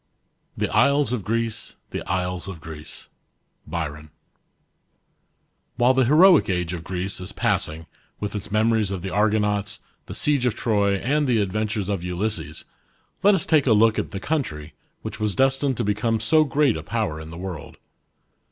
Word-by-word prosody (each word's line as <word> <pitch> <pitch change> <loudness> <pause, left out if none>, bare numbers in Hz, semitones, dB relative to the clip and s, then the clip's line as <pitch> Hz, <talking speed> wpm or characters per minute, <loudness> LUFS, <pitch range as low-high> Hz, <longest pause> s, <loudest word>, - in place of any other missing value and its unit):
" - - -41
The - - 0
isles 140 -3 +3
of 115 -5 -2
Greece, 115 +1 -2 0.2
the - - -3
isles 90 0 -2
of 95 -4 -7
Greece." 80 -1 -9 0.6
BYRON. 75 -2 -5 1.7
WHILE 125 +2 +4
the 130 -1 +3
heroic 165 - +6
age 90 -2 -1
of 85 -2 -5
Greece 95 +2 -4
is 90 +2 -6
passing 80 -3 -1 0.3
with 105 -1 -4
its 105 -1 -6
memories 110 -1 +2
of 95 -3 -4
the 95 - -4
Argonauts, 105 0 +1 0.3
the - - -6
siege 140 -4 +1
of 120 - 0
Trc/, 100 -3 +1
and 145 +3 +1
the 120 -3 +2
adventures 105 0 -1
of 100 -4 -2
Ulysses, 90 -4 -3 0.6
let 200 +1 +5
us 185 - 0
take 155 -4 +3
a 115 - +6
look 110 +1 +4
at - - -3
the 95 - -5
country, 80 - -3 0.3
which - - -6
was 105 -2 -1
destined 135 -1 +2
to - - 0
become 110 +2 0
so 155 +7 +3
great 140 -3 +2
a - - -5
power 105 -9 -2
in 80 - -9
the 85 - -9
world. 90 -4 -7
105 Hz, 170 wpm, -23 LUFS, 90-125 Hz, 1.7 s, heroic